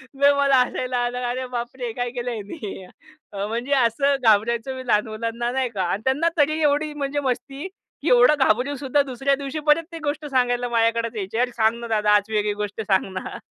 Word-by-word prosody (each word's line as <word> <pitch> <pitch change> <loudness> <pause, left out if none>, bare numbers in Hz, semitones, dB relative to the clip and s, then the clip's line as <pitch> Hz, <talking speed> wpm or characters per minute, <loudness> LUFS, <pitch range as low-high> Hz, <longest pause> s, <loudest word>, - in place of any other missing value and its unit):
लय 280 +1 +5
मला 280 -1 +4
हसायला 250 0 -3
आलं. 245 0 -1
अरे 255 +1 -3
बापरे! 245 +1 -5
हे - - -3
काय 245 +1 -2
केलं 245 0 -4
ह्यानी. 205 - -7 0.6
म्हणजे 240 +5 -2
असं 275 +2 +3
घाबरवायचो 230 +4 +2
मी 260 -1 -8
लहान 210 -1 +2
मुलांना 230 +2 -3
नाही 260 0 0
का. 200 -5 -3
आणि 200 - -1
त्यांना 285 +6 +2
तरी 310 +1 +2
एवढी 300 +1 +1
म्हणजे 290 0 -2
मस्ती 270 +6 -4 0.4
की - - +1
एवढं 250 +4 +6
घाबरून 265 +2 +2
सुद्धा, 280 +1 +1
दुसऱ्या 270 +2 0
दिवशी 280 +2 -4
परत 300 +2 +4
ती 335 - -6
गोष्ट 295 +1 -2
सांगायला 245 -3 0
माझ्याकडेच 230 0 +1
यायचे. 205 +1 -4
"अरे 250 0 +1
सांग 225 0 +1
ना 235 - -6
दादा. 210 -2 +2
आज 205 +1 +1
वेगळी 210 -1 +1
गोष्ट 210 +1 -4
सांग 195 -3 +1
ना." 185 - -5
245 Hz, 200 wpm, -23 LUFS, 225-275 Hz, 0.6 s, एवढं